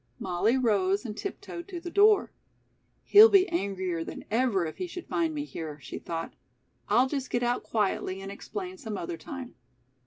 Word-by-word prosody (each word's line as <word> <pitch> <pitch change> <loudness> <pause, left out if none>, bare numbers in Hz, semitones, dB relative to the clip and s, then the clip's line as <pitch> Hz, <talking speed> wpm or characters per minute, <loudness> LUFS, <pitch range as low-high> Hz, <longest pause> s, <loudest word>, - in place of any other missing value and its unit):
Molly 190 - +1
rose 205 -4 +2
and 210 -3 -5
tiptoed 345 - -6
to 365 -3 -6
the 345 0 -7
door. 415 +2 +5 0.7
"He'll 430 +2 +9
be 390 -2 +5
angrier 190 - -2
than - - -8
ever 225 -6 +2
if 155 - -6
he 365 - -3
should 360 0 -8
find 330 -1 0
me 290 -1 -3
here," 155 - -7
she - - -7
thought. 165 -1 -5 0.6
"I'll 255 +2 +4
just 275 -1 -3
get 240 - 0
out 240 0 +1
quietly 195 -3 -1
and 195 0 -7
explain 370 - -7
some 220 -6 -5
other 170 -1 -4
time." 260 - -8
240 Hz, 180 wpm, -28 LUFS, -, 0.7 s, He'll